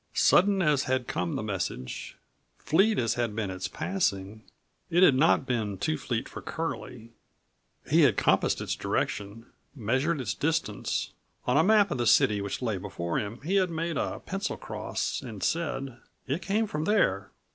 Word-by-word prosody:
Sudden 195 0 +4
as 150 -4 +2
had 130 -2 0
come 85 0 -2
the - - -2
message, 90 -11 -4 0.4
fleet 205 +7 +2
as 115 -2 +1
had 120 -3 -2
been 105 -4 -2
its 95 +1 -4
passing, 110 - -2 0.5
it 175 +2 +4
had 145 - +7
not 135 +1 +3
been 110 -6 -1
too 155 +12 0
fleet 120 -5 -3
for - - -8
Curlie. 125 -8 -5 0.8
He - - +4
had - - +4
compassed - - +2
its - - -2
direction; 105 +3 -3 0.3
measured 130 +7 0
its 130 - -2
distance. 145 -9 -1 0.3
On 125 - +1
a 160 - +5
map 205 0 +4
of 135 - -2
the 120 - +1
city 105 -1 +4
which 100 +5 -4
lay 110 -5 0
before 85 -1 -3
him 110 +3 -5
he 180 +7 0
had 185 -2 +2
made 165 0 -2
a - - -2
pencil - - -3
cross - - -3
and 110 -5 -7
said: 135 -6 -2 0.3
"It 145 +6 -2
came 205 +5 +1
from 155 -6 -3
there." 210 +1 +2
130 Hz, 170 wpm, -28 LUFS, 105-165 Hz, 0.8 s, had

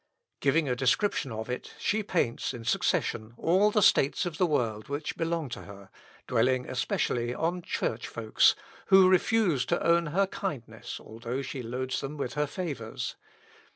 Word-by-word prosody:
Giving 145 +2 +2
a 125 - +1
description 135 - +1
of 110 0 -5
it, 125 0 -5
she 215 +1 0
paints, 170 - -1
in 115 -2 -9
succession, 110 -1 0
all 190 +5 +3
the 210 -1 +2
states 140 0 +4
of 165 -3 -5
the 180 - +4
world 115 -8 -1
which 145 +2 -3
belong 165 -2 -1
to - - -6
her, 100 -1 -12 0.3
dwelling, 125 +1 +1
especially, 120 -1 -1
on 175 +3 -1
church 115 -8 -2
folks, 110 -1 +3 0.3
who 190 -1 +7
refuse 185 - +3
to - - 0
own 170 0 +4
her 190 +6 +2
kindness, 170 - -5
although 120 +4 -5
she 130 0 -5
loads 125 +2 -3
them 145 +2 -5
with 125 -4 -3
her 150 0 0
favours. 140 -10 -4
140 Hz, 160 wpm, -29 LUFS, 120-170 Hz, 0.3 s, who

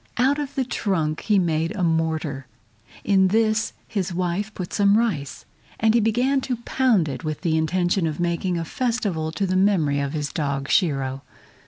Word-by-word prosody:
Out 270 +4 +2
of 290 -2 -5
the 265 - 0
trunk 165 -10 -1
he 210 -2 +3
made 165 +1 0
a 190 - -2
mortar. 160 -4 -1 0.6
In 190 -2 +4
this 220 +2 +1
his 195 -4 -2
wife 180 +4 -2
put 180 -2 -6
some 200 0 +4
rice, 180 - -2 0.3
and 220 0 +3
he 235 - +4
began 245 +5 +2
to 255 -1 -2
pound 235 -11 +2
it 140 - -5
with 155 -1 -4
the 165 -4 +1
intention 175 +2 +1
of 155 0 -4
making 175 +1 -1
a 165 - -3
festival 205 -8 -1
to 200 - -1
the 185 0 -1
memory 180 -7 +2
of 140 0 -2
his 150 -2 -3
dog 140 -3 -2
Shiro. 135 -6 +1
180 Hz, 180 wpm, -23 LUFS, 155-215 Hz, 0.6 s, In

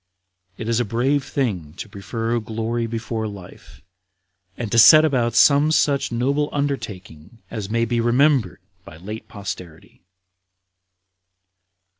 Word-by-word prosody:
It 110 - -6
is 115 0 +1
a - - +2
brave 125 +6 0
thing 95 - -3
to - - -8
prefer 115 +4 -3
glory 115 +1 -3
before 115 -1 -4
life, 100 -3 -12 0.7
and 115 -4 -5
to 115 - +4
set 155 +6 +8
about 120 -6 0
some 145 +3 +5
such 140 -4 +1
noble 140 +5 0
undertaking 115 - -5
as 105 -2 -5
may 115 +1 +1
be 115 0 -1
remembered 125 -2 +2 0.2
by 80 - -13
late 105 +6 -8
posterity." 90 -5 -9
115 Hz, 125 wpm, -21 LUFS, 105-135 Hz, 0.7 s, set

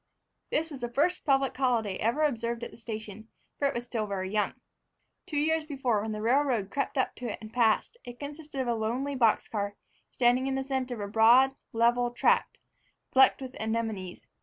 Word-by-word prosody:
This 320 +1 -1
was 270 -3 -8
the 240 - -2
first 310 +9 +1
public 270 -2 +2
holiday 235 -7 +1
ever 240 +8 +1
observed 235 -4 -1
at - - -6
the - - -14
station, 220 -2 -7 0.3
for 280 - +3
it - - -2
was 240 - -2
still 230 -3 -3
very 190 -1 -3
young. 210 -1 0 0.7
Two 300 - -3
years 315 +1 +1
before, 260 -7 0
when 220 +1 -3
the 215 0 -4
railroad 245 -5 +2
crept 280 0 -2
up 260 - +1
to 245 -3 -4
it - - -5
and 215 0 -11
passed 235 - +2
it, 245 - -8
it 245 - -25
consisted 295 0 -7
of 255 - -3
a 240 - +2
lonely 240 +6 -2
box 235 -5 +2
car 205 -2 -3 0.3
standing 250 +1 +2
in 270 - -1
the 270 - -1
center 260 -2 -2
of 215 - -7
a 200 - -3
broad, 245 +5 +6 0.2
level 240 +1 +2
tract 240 - +1 0.5
flecked 265 +1 +5
with 260 0 -7
anemones. 220 -5 -3
240 Hz, 205 wpm, -29 LUFS, 220-270 Hz, 0.7 s, broad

